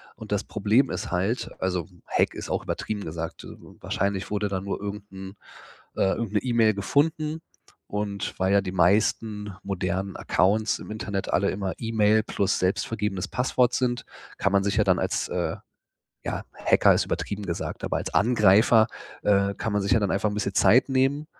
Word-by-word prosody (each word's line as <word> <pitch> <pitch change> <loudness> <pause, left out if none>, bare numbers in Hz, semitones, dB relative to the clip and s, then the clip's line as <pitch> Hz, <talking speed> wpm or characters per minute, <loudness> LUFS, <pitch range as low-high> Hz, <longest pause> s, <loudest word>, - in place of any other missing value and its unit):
Und - - -11
das - - 0
Problem 125 +6 +2
ist 110 - -4
halt 95 +7 -1
also, 90 -3 -1 0.2
Hack - - +1
ist - - -7
auch - - -1
übertrieben 105 -2 -3
gesagt, 80 +1 -5
äh, - - -10 0.3
wahrscheinlich 100 0 -2
wurde 105 0 0
dann 95 -1 -3
nur 100 - -3
irgend 100 0 -6
'n 95 +1 -9 0.6
äh, 95 - +2
irgend 115 -3 -4
'ne 105 - +3
E-Mail 115 -4 +3
gefunden. 150 +10 0 0.5
Und 100 -1 -3
weil 95 +1 +2
ja 100 - +5
die 95 - -5
meisten 105 +2 +1
modernen 95 0 -2
Accounts 105 +4 +1
im - - -10
Internet 100 -2 -4
alle 100 +2 +2
immer 95 -1 -3
E-Mail 110 -1 +2
plus 100 -2 0
selbst 90 +1 0
vergebenes 105 -4 -2
Passwort 125 0 +1
sind, 120 -1 -1 0.3
kann 95 - +1
man 100 0 +3
sich 100 +2 0
ja 105 - +5
dann 95 -2 +3
als - - -1
äh, - - -1 0.7
ja, - - -3
Hacker - - +4
ist - - +1
übertrieben 100 0 -3
gesagt, 85 -3 -4
aber - - -1
als - - -5
Angreifer, 110 0 +5 0.4
äh, 100 -1 +2
kann 110 - -3
man 105 -1 +1
sich 100 - 0
ja 115 - +4
dann 100 - 0
einfach 105 +1 +1
'n - - -4
bisschen 100 -1 -2
Zeit 125 +8 +5
nehmen, 135 +3 +1
105 Hz, 185 wpm, -25 LUFS, 95-110 Hz, 0.7 s, ja